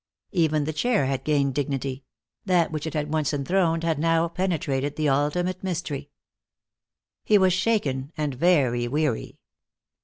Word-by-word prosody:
Even 155 -5 +2
the 155 +2 -3
chair 210 - +1
had 135 0 -2
gained 140 -3 +1
dignity; 135 -1 -3 0.4
that 180 -4 +2
which 155 0 -3
it 160 - -5
had 150 0 -2
once 155 -2 0
enthroned 165 +3 +1
had 165 -3 0
now 165 +1 +2
penetrated 155 -6 -1
the 155 -1 0
ultimate 165 +7 0
mystery. 155 -6 -3 1.1
He 210 - +4
was 190 -2 +4
shaken 160 -10 0
and 150 -2 -1
very 130 -6 +2
weary. 145 -2 -1
155 Hz, 145 wpm, -25 LUFS, 140-175 Hz, 1.1 s, He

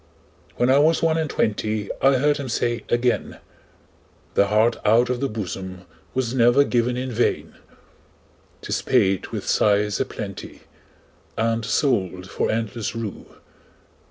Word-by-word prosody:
When 125 +1 +2
I 135 - +5
was 160 +3 +3
one 165 0 +2
and 155 -2 -2
twentyI 105 -2 -1
heard 140 +2 +3
him 140 -3 -5
say 120 0 -1
again,'The 120 -4 -3
heart 110 +3 +2
out 120 +4 +3
of 125 - -2
the 140 - -1
bosomWas 95 +4 -5
never 120 +2 +5
given 125 -2 0
in 130 0 -3
vain;'Tis 120 +1 -5
paid 95 -1 +2
with - - -6
sighs 105 0 +2
a 135 - +1
plentyAnd 115 +2 -6
sold 95 - 0
for - - -1
endless 110 0 -3
rue. 115 -3 -6
115 Hz, 120 wpm, -23 LUFS, 105-130 Hz, -, I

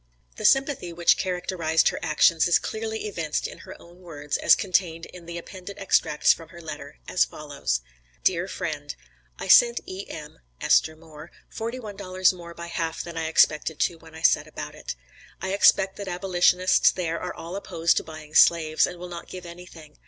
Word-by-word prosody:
The - - -5
sympathy 270 - +2
which 170 0 +3
characterized 180 -3 0
her - - -5
actions 155 +2 +3
is 175 - +5
clearly 220 0 -4
evinced 165 -7 -3
in - - -7
her - - -11
own 175 +1 -17
words, 150 -5 -5
as - - +5
contained 180 -6 -1
in 175 -2 -13
the 170 0 -6
appended 185 +3 -9
extracts 170 -6 +3
from 165 -1 -12
her 170 0 -12
letter, 160 - -9
as - - +3
follows: - - -3 0.4
"DEAR - - +1
FRIEND: - - -5 0.4
I - - -6
sent 235 0 +6
E.M. 165 -5 -8 0.2
(Esther 160 - +3
Moore) 160 0 -13 0.2
forty 230 +2 -4
one 210 -4 -8
dollars 185 -1 +2
more 170 -1 -11
by 170 - -7
half 165 -1 -3
than 170 -1 -9
I 165 -1 -2
expected 160 -1 +3
to 170 -2 0
when 160 -1 -15
I 160 - -10
set - - +4
about - - -7
it. - - -7 0.4
I 190 0 -3
expect 195 -1 +4
that 200 - -6
abolitionists 180 0 +3
there 170 -2 -2
are - - -4
all 170 +3 -7
opposed 170 -4 0
to - - +1
buying 155 -1 -11
slaves, 160 -2 +5
and 180 - -8
will 180 +1 -8
not 170 -1 -8
give 180 -1 -8
anything. 170 -3 -12
170 Hz, 185 wpm, -25 LUFS, 160-185 Hz, 0.4 s, sent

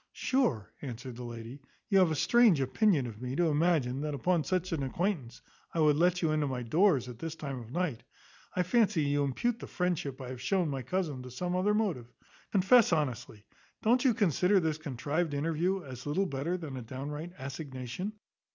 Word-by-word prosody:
"Sure," 245 - 0
answered 125 -2 -6
the 125 - -7
lady, 120 +2 -8 0.3
"you 195 - +4
have 185 -3 +5
a 160 - 0
strange 225 - +5
opinion 140 - +2
of 115 -2 -8
me, 125 +1 -3
to 170 +1 +2
imagine, 150 -4 +1
that 150 -1 -2
upon 170 +4 +1
such 185 +1 -1
an 160 -4 -1
acquaintance, 135 - -2 0.3
I - - 0
would 150 -2 +5
let 180 +3 +2
you 160 - +2
into 155 -1 +1
my 130 -2 -3
doors 150 - +3
at 120 -2 -9
this 165 +2 -5
time 140 -5 -5
of 115 -1 -11
night. 165 -7 -1 0.5
I 180 - +2
fancy 190 -4 +2
you 145 0 +1
impute 230 - -1
the - - -8
friendship 170 -7 -2
I 130 -2 -7
have 130 -1 -7
shown 185 -5 +1
my 135 -2 -3
cousin 160 -4 -2
to 125 - -9
some 175 +8 -3
other 200 +3 +2
motive. 165 - -1 0.4
Confess 205 +4 +5
honestly; 125 -8 -2 0.4
don't 245 +3 +4
you 255 -5 +4
consider 195 - +3
this 160 -3 -1
contrived 150 +2 -2
interview 165 +5 0
as 130 -1 -8
little 180 +7 +1
better 165 +3 -2
than 150 -7 -6
a - - -5
downright 145 +8 -6
assignation? 135 - -5
155 Hz, 195 wpm, -31 LUFS, 130-180 Hz, 0.5 s, have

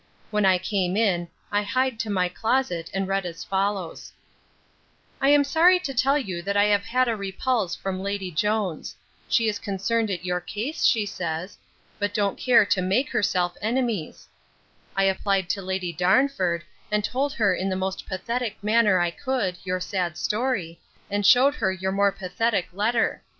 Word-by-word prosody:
When 210 -2 +2
I 185 -1 +5
came 185 0 -1
in, 185 -6 +1 0.2
I 205 0 +2
hied 255 +3 0
to 225 - -2
my 185 -3 +1
closet, 180 -3 -1
and 195 0 -2
read 195 0 0
as 170 -2 -6
follows: 195 -3 -2 1.1
'I 270 - +4
am 290 0 +6
sorry 335 +6 +5
to 325 -7 -5
tell 265 +3 +3
you 190 -11 -4
that 200 +3 -1
I 205 - +5
have 205 -1 +2
had 255 +2 +1
a 230 - +1
repulse 200 -1 -1
from 190 0 -4
Lady 200 -2 -3
Jones. 205 0 -1 0.3
She 230 -3 +3
is 215 0 -1
concerned 215 +3 -1
at 180 -2 -4
your 180 0 0
case, 220 - -3
she 220 -4 +3
says, 170 -1 -4 0.4
but 205 0 -2
don't 200 -2 0
care 245 -4 +5
to 185 -1 +1
make 200 +10 +1
herself 180 -3 0
enemies. 225 -6 -2 0.7
I 195 - +2
applied 195 -1 +1
to 195 - -1
Lady 185 -2 -3
Darnford, 185 - +2 0.3
and 210 0 +1
told 275 +6 -1
her 210 -7 +2
in 190 - -2
the 190 - -1
most 190 +1 -3
pathetic 230 +5 -3
manner 210 -2 +4
I 175 -1 +1
could, 195 -5 -2
your 185 -1 -2
sad 180 -3 -2
story, 210 -8 -1 0.3
and 205 0 0
shewed 260 +7 +6
her 190 -10 0
your 190 0 -2
more 200 +1 +3
pathetic 195 +2 -1
letter. 225 +4 0
200 Hz, 175 wpm, -25 LUFS, 185-230 Hz, 1.1 s, am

